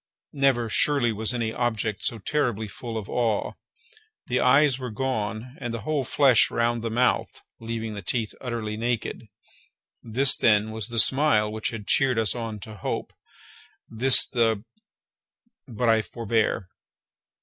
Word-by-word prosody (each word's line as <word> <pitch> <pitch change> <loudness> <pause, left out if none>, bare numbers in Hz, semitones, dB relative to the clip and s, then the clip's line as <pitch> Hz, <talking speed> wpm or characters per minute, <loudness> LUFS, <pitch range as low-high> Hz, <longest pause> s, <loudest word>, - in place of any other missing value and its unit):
Never, 135 -4 +2
surely, 125 +1 +2
was 110 +1 +1
any 115 -2 -2
object 110 -4 -2
so 115 - 0
terribly 115 -2 -1
full 115 +3 -7
of 105 -3 -6
awe! 115 -4 -1 0.7
The 125 - 0
eyes 135 +1 +4
were 125 -1 -5
gone, 110 0 -3
and 120 - -3
the 115 -1 -5
whole 145 +4 -1
flesh 130 -1 +4
around 120 0 0
the 115 - -3
mouth, 120 +3 0 0.2
leaving 115 -1 -5
the 100 - -6
teeth 110 0 -2
utterly 115 -3 -4
naked. 115 0 -3 0.7
This, 125 +4 +3
then, 110 -1 +2
was 110 -1 -5
the 120 -1 -6
smile 120 -3 +3
which 110 0 -3
had 110 -3 -7
cheered 130 0 +2
us 110 -3 +1
on 115 -3 -5
to 110 +1 -9
hope! - - -4 0.8
this 125 +3 +6
the—but 115 -3 0 1.2
I 115 -1 +4
forbear. 110 -4 -2
115 Hz, 145 wpm, -25 LUFS, 110-125 Hz, 1.2 s, this